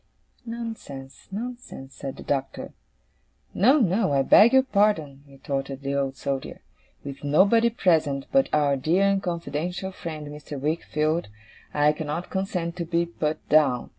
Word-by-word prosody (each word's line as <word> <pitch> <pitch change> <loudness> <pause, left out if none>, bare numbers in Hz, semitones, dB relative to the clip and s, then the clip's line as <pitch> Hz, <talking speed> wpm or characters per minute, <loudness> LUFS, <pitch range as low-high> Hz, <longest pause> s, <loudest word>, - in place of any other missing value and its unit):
'Nonsense, 225 - -7
nonsense,' 225 - -7
said 135 -1 -6
the - - -10
Doctor. 135 -1 -3 0.8
'No, 255 +9 +5
no, 195 - +2
I 135 -1 +3
beg 220 +10 +7
your 265 0 +5
pardon,' 200 - +1
retorted 135 0 -5
the 140 0 -2
Old 135 -1 -1
Soldier. 135 -1 -4 0.4
'With 140 0 -8
nobody 200 +11 +4
present, 160 - +1
but 270 0 +3
our 145 -2 +2
dear 165 +8 +2
and 195 -1 +2
confidential 175 +1 -3
friend 155 -4 -7
Mr. 145 -1 -8
Wickfield, 155 +1 -1 0.4
I 150 0 +3
cannot 155 +3 -5
consent 180 -3 -2
to 170 - -3
be 170 +1 0
put 155 -2 -4
down. 140 -5 +3
155 Hz, 140 wpm, -25 LUFS, 140-195 Hz, 0.8 s, beg